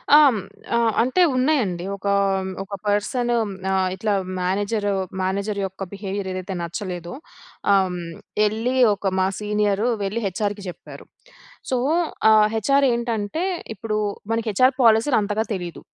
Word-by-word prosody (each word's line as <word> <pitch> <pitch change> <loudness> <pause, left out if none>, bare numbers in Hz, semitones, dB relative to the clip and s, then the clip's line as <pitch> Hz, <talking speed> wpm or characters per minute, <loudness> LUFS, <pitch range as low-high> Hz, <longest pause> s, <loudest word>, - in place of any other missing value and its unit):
ఆహ్, 300 - +9
హ్మ్, 225 - -1 0.4
ఆ! - - +4 0.2
అంటే 255 +9 +2
ఉన్నాయండి. 250 - +1
ఒకా 200 0 -1 0.5
ఒక 200 +1 -7
పర్సను. 235 +4 +1 0.4
ఆహ్, 190 -1 +2
ఇట్లా 210 +2 -1 0.3
మేనేజర్ 205 +3 0 0.3
మేనేజర్ 200 +2 -1
యొక్క 190 0 -6
బిహేవియర్ 195 -1 -4
ఏదైతే 185 +1 -4
నచ్చలేదో. 175 0 -5 0.6
ఆహ్, 190 -1 +4
హ్మ్, 180 - -4 0.5
ఎళ్ళి 225 +5 0 0.2
ఒక 195 -1 -2
మా 185 - +3
సీనియరు 210 +1 0 0.2
వెళ్ళి 210 +4 -2
హెచ్ఆర్‌కి 205 +1 -3
చెప్పారు. 175 - -11 0.7
సో, 255 - +2 0.5
ఆ - - +7 0.2
హెచ్ఆర్‌ 275 +5 +3
ఏంటంటే, 235 - -2 0.3
ఇప్పుడు 215 -2 -3 0.3
మనకి 225 0 -1
హెచ్ఆర్‌ 255 +6 +4
పాలసీలు 230 +3 +5
అంతగా 210 +2 0
తెలీదు. 175 -3 -5
205 Hz, 130 wpm, -22 LUFS, 190-230 Hz, 0.7 s, ఆహ్